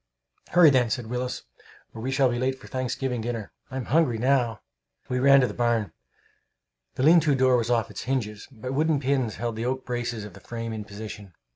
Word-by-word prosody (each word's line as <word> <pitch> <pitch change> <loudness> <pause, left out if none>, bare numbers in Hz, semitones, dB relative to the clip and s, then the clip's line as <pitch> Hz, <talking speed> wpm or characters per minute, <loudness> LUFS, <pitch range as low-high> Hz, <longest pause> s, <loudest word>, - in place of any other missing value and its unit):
"Hurry, 175 -4 +7
then," 125 -3 +3
said 120 +1 -2
Willis, 125 +2 -3 0.5
"or 110 - -8
we 130 - -2
shall 135 0 +3
be 120 -1 -1
late 130 +1 -1
to - - -13
Thanksgiving 130 -1 -2
dinner! 115 -3 -4 0.2
I'm 130 -2 -4
hungry 140 -4 +2
now!" 120 -3 +1 0.5
We 125 - 0
ran 140 +1 +6
to 125 - +3
the - - -6
barn. 115 -5 0 1.0
The 130 - -1
lean 165 +4 +7
to 150 -3 +2
door 130 -1 +4
was 120 -1 0
off 115 -2 +1
its - - -7
hinges, 110 -5 -2
but 125 +1 -6
wooden 155 +1 +2
pins 130 -5 0
held 115 -2 -3
the 115 - -2
oak 130 +1 -2
braces 120 -3 -3
of 105 - -10
the - - -13
frame 115 -1 -5
in 110 -1 -5
position. 105 -3 -9
125 Hz, 210 wpm, -26 LUFS, 115-130 Hz, 1.0 s, Hurry